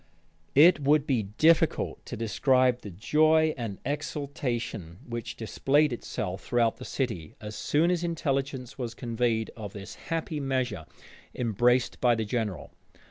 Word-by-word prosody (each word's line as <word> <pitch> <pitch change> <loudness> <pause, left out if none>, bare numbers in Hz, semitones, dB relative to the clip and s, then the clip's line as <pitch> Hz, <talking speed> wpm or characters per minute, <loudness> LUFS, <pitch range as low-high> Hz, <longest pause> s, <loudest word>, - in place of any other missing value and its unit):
It 165 +4 +7
would 145 +1 +3
be 130 -6 +1 0.2
difficult 165 +1 +3
to - - -5
describe 125 +3 +2
the 105 - -8
joy 155 - +3
and 115 -6 -5
exultation 135 - -3
which 120 -1 -5
displayed 140 +5 +2
itself 95 -4 -4
throughout 120 -2 +1
the 125 - -9
city, 110 - -3
as 105 0 -7
soon 165 +4 +2
as 175 -1 0
intelligence 135 -6 -2
was 120 -2 -4
conveyed 115 -2 -1
of 105 -4 -7
this 100 -1 -8 0.2
happy 160 -2 -2
measure 130 - -2 0.5
embraced 120 +2 +1
by 120 -2 +4
the 110 -1 -2
general. 105 -6 -3
125 Hz, 135 wpm, -28 LUFS, 110-145 Hz, 0.5 s, It